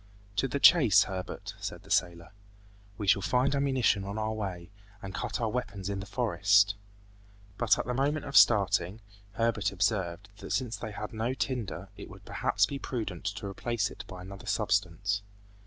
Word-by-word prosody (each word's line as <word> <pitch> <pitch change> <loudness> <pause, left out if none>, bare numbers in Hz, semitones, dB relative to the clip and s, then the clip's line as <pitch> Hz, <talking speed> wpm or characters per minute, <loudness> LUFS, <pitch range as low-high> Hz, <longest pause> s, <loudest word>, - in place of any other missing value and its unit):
"To 135 - +2
the 140 +2 -2
chase, 120 - +7
Herbert," 95 -2 -6
said - - -6
the - - -13
sailor. 85 -1 0 0.7
"We 105 - -4
shall 100 0 +4
find 130 +6 +2
ammunition 130 -7 +2
on 100 +2 -5
our 110 0 -1
way, 95 -4 -5 0.3
and 95 -1 -8
cut 110 +1 -3
our 115 -2 0
weapons 105 -6 -4
in 100 - -3
the 95 - -7
forest." 105 -4 +3 0.9
But 115 -3 +4
at - - -2
the 125 - -2
moment 145 +4 0
of 140 - -6
starting, 100 -1 +4 0.3
Herbert 115 -3 0
observed, 95 -1 -1
that 105 - -5
since 125 -3 -1
they 110 - -6
had 105 +1 -6
no 115 +4 -1
tinder, 100 -10 -3
it - - -9
would - - -13
perhaps 105 0 +1
be 140 +6 -5
prudent 110 -11 -4
to 105 0 -3
replace 105 +2 -2
it - - -9
by 90 -1 -9
another 100 +4 -10
substance. 100 -2 0
105 Hz, 175 wpm, -29 LUFS, 95-120 Hz, 0.9 s, chase